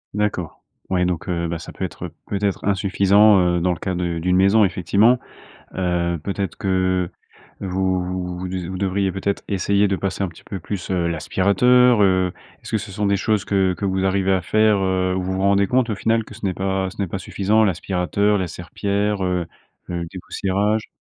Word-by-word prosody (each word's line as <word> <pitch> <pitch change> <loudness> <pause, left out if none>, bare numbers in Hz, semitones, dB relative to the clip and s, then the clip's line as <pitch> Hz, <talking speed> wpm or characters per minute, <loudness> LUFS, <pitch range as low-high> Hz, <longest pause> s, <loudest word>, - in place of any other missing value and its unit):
D'accord, 105 -6 -2 0.3
ouais 90 -1 +1
donc, 90 0 -2
heu, 85 -1 -1
bah, 80 0 -3
ça - - -9
peut - - -4
être, - - -7
heu, - - -14
peut-être 100 -1 -2
insuffisant, 100 +1 +4 0.2
heu, - - +1
dans 90 +1 +1
le - - -8
cas 95 - -2
de 85 -1 -2
d'une 90 +2 +1
maison 100 +3 +5
effectivement. 100 +7 +3 0.6
Heu, 85 -2 0
peut-être 100 -3 -3
que 95 -2 0 0.5
vous 95 -1 0
vous 90 -1 -4
vous 95 - -4
diz 90 -2 -4
vous 95 - -5
devriez 95 0 0
peut-être 95 +1 -2
essayer 100 +1 +2
de 95 - 0
passer 100 +1 -2
un 95 - -1
petit 80 - -17
peu 95 -4 -6
plus, 95 +1 -5
heu, 85 -2 +1
l'aspirateur, 105 +8 +3
heu, 95 -2 +3 0.3
est-ce - - -10
que 110 - +2
ce 105 -1 -7
sont 105 +1 -1
des 100 0 +2
choses 105 0 0
que 95 -2 +1
que 90 - -8
vous 95 0 0
arrivez 95 0 +1
à 95 -1 +2
faire, 110 +1 +3
heu, 95 -1 0
où 95 - -1
vous 95 +1 -2
vous 95 - -2
rendez 100 0 +3
compte 125 -2 +1
au 105 - -1
final 115 +2 +1
que 110 - -13
ce 105 -1 -7
n'est 95 - 0
pas 95 0 -1
ce 100 - -7
n'est 95 - -1
pas 95 - -4
suffisant 105 +3 +1
l'aspirateur, 95 +3 0
la 95 - -1
serpillère, 100 +4 -2
heu, 90 -2 -1 0.4
le 85 -1 -3
dépoussiérage? 100 +4 -2
95 Hz, 210 wpm, -21 LUFS, 90-100 Hz, 0.6 s, maison